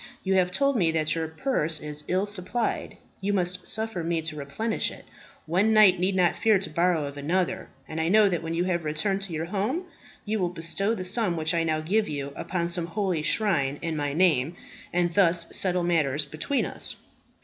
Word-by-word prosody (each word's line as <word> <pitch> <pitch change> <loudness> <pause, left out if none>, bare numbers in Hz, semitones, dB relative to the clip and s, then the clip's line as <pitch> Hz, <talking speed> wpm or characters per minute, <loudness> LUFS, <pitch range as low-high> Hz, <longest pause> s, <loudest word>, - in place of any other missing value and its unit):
You 190 - +1
have 185 -1 +3
told 275 +6 +1
me 175 -6 +3
that 155 -1 +1
your 165 -1 -2
purse 160 - 0
is 150 0 -4
ill 185 +2 +1
supplied; 205 +3 -2 0.2
you 200 +1 -1
must 180 -1 -1
suffer 220 -5 -1
me 165 -1 -1
to 155 -1 -3
replenish 150 +11 -2
it. - - -12 0.4
One 190 +7 +2
knight 200 -4 +6
need 185 +2 +1
not 180 -2 +3
fear 220 -2 +3
to 190 -2 -4
borrow 170 -1 +1
of 140 0 -7
another; 170 +5 -1 0.2
and 160 +1 -3
I 160 - 0
know 210 +2 +6
that 175 -4 -1
when 165 0 -4
you 170 - +1
have 175 -2 -1
returned 160 +6 -1
to 195 -3 -4
your 160 +1 -2
home, 210 - -2 0.4
you 215 0 -1
will 180 -2 0
bestow 180 +6 -1
the 185 - -5
sum 185 -2 +1
which 160 +1 0
I 165 -1 +1
now 155 -1 0
give 205 +6 0
you 140 -1 -4
upon 170 -2 -2
some 170 -1 0
holy 185 -3 -1
shrine 155 -6 +1
in 165 -1 -2
my 145 -1 -1
name, 160 -3 +2 0.4
and 175 -1 +1
thus 170 -2 +4
settle 180 -2 +3
matters 155 -4 +1
between 155 - -2
us." - - -3
175 Hz, 205 wpm, -26 LUFS, 160-195 Hz, 0.4 s, knight